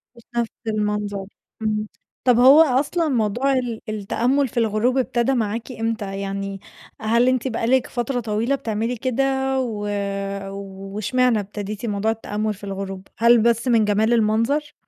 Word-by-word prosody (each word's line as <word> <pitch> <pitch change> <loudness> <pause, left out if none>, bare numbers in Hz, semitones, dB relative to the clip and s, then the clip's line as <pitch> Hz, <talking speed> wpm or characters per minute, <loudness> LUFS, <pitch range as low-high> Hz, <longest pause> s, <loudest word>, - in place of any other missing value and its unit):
مش 235 - -16
نفْس 235 -1 +1 0.2
المنظر، 210 -2 -1 0.4
إمم، 215 -1 -1 0.4
طب 245 -2 +4
هو 275 +5 +8
أصلًا 300 +4 +2
موضوع 245 +3 +1
ال 245 -4 -2
التأمُّل 240 +6 0
في 240 - -11
الغروب 230 +3 +2
ابتدا 250 0 +1
معاكِ 230 +1 -2
إمتى؟ 225 -4 -3
يعني 195 0 -4 0.4
هل 235 +3 +3
أنتِ 255 0 +1
بقى 230 -1 -2
لِك 260 0 +3
فترة 245 +1 -2
طويلة 225 +4 0
بتعملي 230 -1 -2
كده 255 +2 0 0.4
و 215 -5 -3 1.1
واشمعنى 250 +1 +2
ابتديتِ 205 +2 -5
موضوع 210 +1 0
التأمُّل 215 -1 -2
في 200 - -17
الغروب؟ 195 -1 -5
هل 235 +1 +6
بس 235 +1 +2
من 230 -3 +4
جمال 215 +3 +2
المنظر؟ 230 +7 +1
225 Hz, 145 wpm, -22 LUFS, 210-250 Hz, 1.1 s, هو